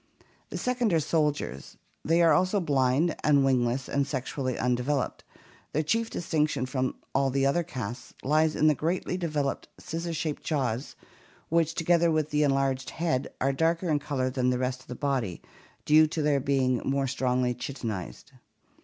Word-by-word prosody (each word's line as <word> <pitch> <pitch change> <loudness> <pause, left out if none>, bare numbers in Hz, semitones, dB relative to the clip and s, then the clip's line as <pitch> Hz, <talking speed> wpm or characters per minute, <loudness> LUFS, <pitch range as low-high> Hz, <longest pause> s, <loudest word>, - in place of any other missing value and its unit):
The - - -5
second 245 -3 0
are - - +5
the - - +3
soldiers. 150 - -1 0.3
These 165 +2 +3
are 165 - +6
also 185 +3 +2
blind 145 0 +2
and 140 -2 +4
wingless 125 -1 +1
and 140 0 0
sexually 130 -1 -3
undeveloped. 125 +2 -1 0.5
Their 155 - +1
chief 225 +8 0
distinction 150 -5 0
from 130 0 -2 0.2
all 135 0 +2
the 135 +1 +1
other 140 +6 +2
castes 125 -8 -6
lies 155 +2 +2
in 155 - +2
the 155 - +6
greatly 170 +5 -1
developed 155 -6 -2
scissors 165 0 -4
shaped 155 -1 -3
jaws 130 -4 -2 0.5
which, 165 0 +1
together 170 0 +3
with 155 -1 0
the 150 0 +2
enlarged 135 -2 +1
head, 160 -6 -1
are 135 +1 +1
darker 165 +4 +1
in 150 - +2
color 140 -3 -2
than 125 -1 +1
the 125 - +1
rest 125 0 -2
of - - -20
the 125 - -6
body, 130 - -1 0.5
due 155 +1 +6
to 155 0 -2
their 145 -1 +3
being 130 -2 +1
more 135 0 0
strongly 125 -1 0
chitinized. 115 - -6
140 Hz, 170 wpm, -28 LUFS, 130-160 Hz, 0.5 s, are